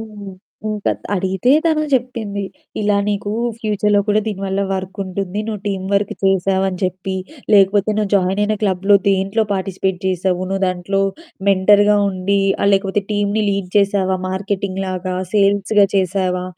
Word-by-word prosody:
హ్మ్. 210 -3 -9 0.4
ఇంకా 210 -1 -1 0.2
అడిగితే 190 +4 0
తను 315 -2 +2
జెప్పింది, 230 -6 -1 0.4
"ఇలా 205 -1 +2
నీకు 205 0 -2 0.3
ఫ్యూచర్‌లో 210 -1 +1
కూడా 210 +1 +3
దీని 205 -3 -3
వల్ల 195 +1 -1
వర్కుంటుంది. 190 0 -4
నువ్వు 215 -3 -4
టీమ్ 190 -2 -2
వర్క్ 200 0 +1
చేశావని 190 0 +1
జెప్పి, 185 +1 -2 0.4
లేకపోతే 200 +1 +4
నువ్వు 210 -2 -1
జాయినయిన 200 +3 +1
క్లబ్‌లో 195 0 +3
దేంట్లో 195 +3 +1
పార్టిసిపేట్ 190 -1 -2
జేశావు? 185 0 0
నువ్వు 195 0 -2
దాంట్లో 185 +2 -1 0.5
మెంటర్‌గా 205 +2 +5
ఉండి, 195 +1 0 0.2
ఆహ్, 200 - +4
లేకపోతే 195 +1 +1
టీమ్‌ని 205 +1 0
లీడ్ 195 -2 -2
చేశావా? 195 -2 +2
మార్కెటింగ్ 195 0 -3
లాగా? 185 0 -3 0.2
సేల్స్‌గా 200 0 +3
చేశావా? 185 -1 0
195 Hz, 135 wpm, -18 LUFS, 190-205 Hz, 0.5 s, మెంటర్‌గా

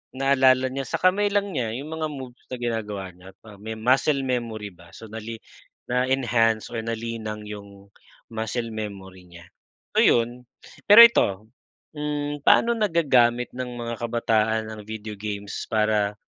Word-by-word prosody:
naalala 130 -1 +3
niya, 135 -1 -3
sa - - -2
kamay 195 +3 +3
lang 205 -1 +1
niya 115 -6 -2
'yong 140 +4 -7
mga 160 0 -3
moves 130 -3 -9
na - - -3
ginagawa 105 -5 -3
niya't 90 +2 -16
ah, 105 -2 -13
may 110 +1 -5
muscle 135 +5 +2
memory 115 -5 -3
ba. 85 0 -18
So 110 - -11
nali 110 +1 -7 0.5
na-enhance 120 -3 +1
or - - -3
nalinang 110 -2 -5
'yong 100 -1 -11 0.4
muscle 115 +1 -3
memory 95 -4 -7
niya, 85 0 -13 0.5
so, - - +5
'yon. 120 +1 +2 0.4
Pero 210 +3 +10
ito, 110 - +1 0.5
hmm, 145 0 -3
pa'no 235 0 +5
nagagamit 130 - +2
ng 125 -1 -4
mga 115 0 -4
kabataan 110 -1 0
ang 110 -1 -8
video 110 0 -7
games 100 0 -5
para, 105 -1 +1
115 Hz, 145 wpm, -24 LUFS, 105-130 Hz, 0.5 s, Pero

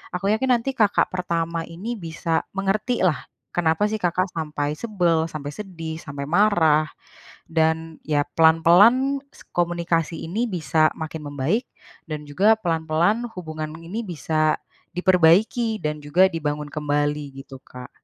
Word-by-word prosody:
Aku 185 +2 -2
yakin 260 +4 0
nanti 265 +3 -2
kakak 210 -3 +3
pertama 170 -2 -1
ini 195 +9 -5
bisa 165 -1 -2
mengerti 210 +5 0
lah, 155 -7 0 0.3
kenapa 165 +3 +2
sih 220 - -2
Kakak 180 +1 0
sampai 150 -2 -2
sebel, 175 -7 +1
sampai 145 -2 -6
sedih, 165 -6 -6
sampai 140 -1 -6
marah, 160 -6 +3 0.6
dan 160 0 0
ya 145 -2 +2
pelan-pelan, 180 - +5 0.2
se - - -15
komunikasi 170 -1 0
ini 220 +8 -1
bisa 160 -2 +2
makin 160 -1 -6
membaik, 145 - -1 0.4
dan 155 -1 -4
juga 200 +9 +4
pelan-pelan 170 +5 0
hubungan 155 -2 -5
ini 200 +8 -5
bisa, 155 -1 0 0.4
diperbaiki, 190 +6 +3
dan 150 0 -2
juga, 170 +6 +4
dibangun 150 -2 -3
kembali, 145 -1 -1
gitu 135 -1 -12
Kak. 125 -1 -11
165 Hz, 135 wpm, -23 LUFS, 155-195 Hz, 0.6 s, pelan-pelan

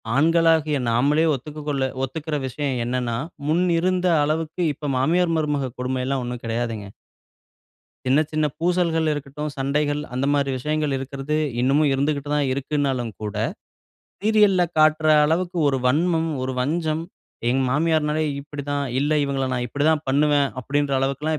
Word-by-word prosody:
ஆண்களாகிய 160 -1 +3
நாமளே 145 +7 +3
ஒத்துக்க 150 +4 -8
கொள்ள 140 -2 0 0.2
ஒத்துக்கிற 150 +3 -3
விஷயம் 135 +1 -2
என்னென்னா, 120 -1 -1 0.3
முன்னிருந்த 180 +2 +2 0.2
அளவுக்கு 160 +3 -2
இப்ப 145 0 -5
மாமியார், 165 +6 +2
மருமக 145 -4 -1
கொடுமைல்லாம் 130 +1 -1
ஒண்ணும் 120 -1 -6
கிடையாதுங்க. 115 -3 -3 1.2
சின்ன, 130 +3 +4
சின்ன 155 0 +1
பூசல்கள் 170 -2 +1
இருக்கட்டும். 145 +1 -5
சண்டைகள் 145 +2 0
அந்தமாரி 140 +2 +1
விஷயங்கள் 150 +1 -1
இருக்கிறது 135 +2 -4 0.3
இன்னமும் 140 +3 +3
இருந்துகிட்டு 140 +1 -1
தான் 145 -2 +1
இருக்குன்னாலும் 135 -3 -1
கூட, 105 -1 -4 0.9
சீரியல்‌ல 210 -4 +4 0.2
காட்ற 155 0 +4 0.2
அளவுக்கு 175 +3 0
ஒரு 135 - +1
வன்மம், 165 +3 +2
ஒரு 130 0 -3
வஞ்சம். 155 +3 -1 0.5
எங்க 130 +2 +2
மாமியார்னாலே 155 +1 +1 0.2
இப்பிடித்தான். 145 0 -4 0.2
இல்ல 145 +2 +1
இவங்கள 135 -1 -1
நான் 125 0 -1
இப்பிடித்தான் 150 +4 +1
பண்ணுவேன், 145 0 +3
அப்பிடின்ற 140 +2 0
அளவுக்குல்லாம் 145 +4 -1
145 Hz, 125 wpm, -23 LUFS, 135-155 Hz, 1.2 s, சின்ன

